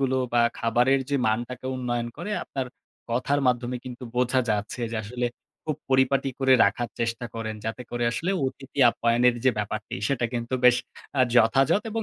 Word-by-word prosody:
গুলো। 130 -1 +1 0.2
বা 120 - +4 0.2
খাবারের 125 +4 +3
যে 140 - +2
মানটাকে 120 +3 -2
উন্নয়ন 120 -2 -2
করে, 185 +5 -5
আপনার 135 -2 -4 0.4
কথার 140 +4 +1
মাধ্যমে 125 0 +1
কিন্তু 125 0 -8
বোঝা 125 +1 +2
যাচ্ছে 105 +3 -2
যে, - - -2
আসলে 120 +3 -2 0.4
খুব 155 -3 -2
পরিপাটি 135 +1 +3
করে 135 -1 +4
রাখার 120 +4 0
চেষ্টা 115 +1 -1
করেন। 110 -1 -4
যাতে 115 +3 -4
করে 120 0 -1
আসলে 175 +9 -1 0.2
অতিথি 135 +1 -8
আপ্যায়নের 120 +1 +3
যে 130 - +6
ব্যাপারটি, 110 +1 -3
সেটা 125 -4 0
কিন্তু 120 +1 -2
বেশ 125 -1 +7 0.4
অ্যা 130 - +4
যথাযথ 135 - +4
এবং 225 +1 -2
125 Hz, 170 wpm, -26 LUFS, 120-130 Hz, 0.4 s, বেশ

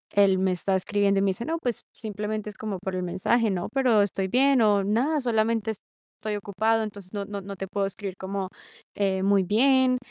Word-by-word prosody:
él 195 -2 +5
me 190 -1 +2
está 190 +2 0
escribiendo 200 +1 +1
y 195 - +1
me 195 - +3
dice: 230 +6 -5
"No, 330 +1 -1
pues 245 -6 -2
simplemente 210 0 -4
es 205 - -11
como 205 -4 -4
por 190 0 -4
el 180 - -2
mensaje, 215 +5 +1
¿no?, 180 -2 -2
pero 250 -6 +4
estoy 195 -1 0
bien", 265 +1 +4
o 205 -2 +3
"Nada, 260 +9 +1
solamente 225 -2 +1 0.5
estoy 215 -1 -3
ocupado, 220 +3 0
entonces 200 -2 -8
no 200 -1 -3
no 200 0 -6
no 200 +1 -7
te 195 - -5
puedo 200 0 -1
escribir 195 -1 -6
como, 190 0 -3 0.5
eh, 190 -2 0
muy 200 -1 +4
bien". 255 +5 +4
205 Hz, 210 wpm, -26 LUFS, 195-225 Hz, 0.5 s, él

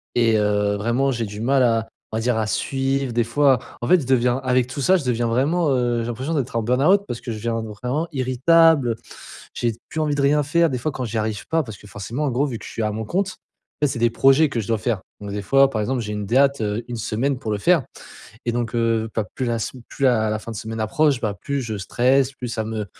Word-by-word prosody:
et 115 -2 +3
heu, 105 0 +1
vraiment 120 +6 +1
j'ai 120 -3 -2
du 105 0 -8
mal 135 +4 +2
à, 115 -2 +2 0.2
on 110 - -2
va 115 - -1
dire 120 0 +1
à 110 - 0
suivre 135 +2 -1
des 120 0 +2
fois. 130 +2 +3 0.2
En 120 - -2
fait 180 -2 +5
je 130 - -7
deviens 125 -1 +3
avec 130 -1 +1
tout 130 +3 -6
ça 185 +8 +4
je 160 - -5
deviens 120 -1 0
vraiment 145 +8 +1
heu 120 -2 +1
j'ai 115 - -4
l'impression 130 +7 -3
d'être 130 -6 -2
en 115 - +1
burn-out 140 - +3
parce 115 - -5
que 120 - -5
je 110 - -4
deviens 115 +1 -2
vraiment 125 +9 -3
irritable 140 +2 +4
heu, - - -2 0.6
j'ai 120 - 0
d - - -17
plus 160 - -4
envie 150 -2 0
de 145 - 0
rien 145 +2 +4
faire. 165 +3 +2
Des 125 - -2
fois, 155 +6 -2
quand 130 -2 -4
j'y 110 -1 -2
arrive 105 -1 -3
pas, 165 0 +2
parce 110 -8 -9
que - - -17
forcément 105 +7 -5
en 145 - 0
gros 135 +5 +1
vu 120 -4 -4
que 105 - -11
je - - -8
suis - - -4
à 105 -1 0
mon 110 +1 -4
compte, 190 - -2 0.4
en - - +4
fait, 140 - +1
c'est 120 - -4
des 120 0 +3
projets 135 +6 +4
que 120 - -2
je 105 - -8
dois 115 - +1
faire. 110 -2 -2 0.2
Donc 100 -1 -7
des 105 0 -3
fois, 135 +7 +4
par 110 -4 -2
exemple, 125 +3 -1
j'ai 105 -1 -4
une 105 -1 -3
date, 135 +4 +3
heu, 105 +2 -2
1 120 - -5
semaine 120 +5 -1
pour 115 -4 -4
le 105 - 0
faire 165 - +3 0.6
et 120 - 0
donc, 120 0 -2
heu, 115 -1 +1
pas 110 - 0
plus 130 - -2
la 120 -1 0
s 115 - -3 0.2
plus 140 - -3
la 110 -4 +3
la 110 - -1
fin 115 +2 -8
de - - -7
semaine 110 +1 -5
approche, 135 +5 +2
bah, 105 -3 -1
plus 140 0 -2
je 110 -3 -4
stresse 130 +7 +2
plus 125 -2 -6
ça 115 -1 -3
me 110 0 -3
j'ai - - -14
120 Hz, 280 wpm, -22 LUFS, 110-135 Hz, 0.6 s, fait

